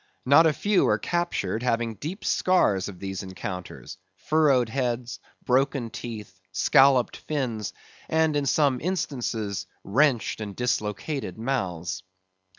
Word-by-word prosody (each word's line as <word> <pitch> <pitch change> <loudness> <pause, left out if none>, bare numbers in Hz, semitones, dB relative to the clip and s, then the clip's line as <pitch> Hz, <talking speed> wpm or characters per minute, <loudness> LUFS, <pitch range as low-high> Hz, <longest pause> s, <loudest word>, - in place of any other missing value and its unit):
Not 145 +5 +7
a - - +4
few 205 +5 +2
are - - +3
captured 170 - -1
having 120 -2 0
the 100 - -21
deep 175 +8 -6
scars 105 - +2
of 95 - -10
these 95 0 -5
encounters,—furrowed 95 - -1
heads, 120 -1 -2 0.3
broken 130 -2 +1
teeth, 105 -5 -8
scolloped 130 +6 +4
fins; 125 -8 -3 0.4
and 160 -1 +2
in 145 -1 0
some 140 -3 +2
instances, 120 - -2 0.2
wrenched 125 0 +2
and 100 -2 -5
dislocated 125 - -2
mouths. 95 -8 -2
120 Hz, 120 wpm, -26 LUFS, 100-145 Hz, 0.4 s, Not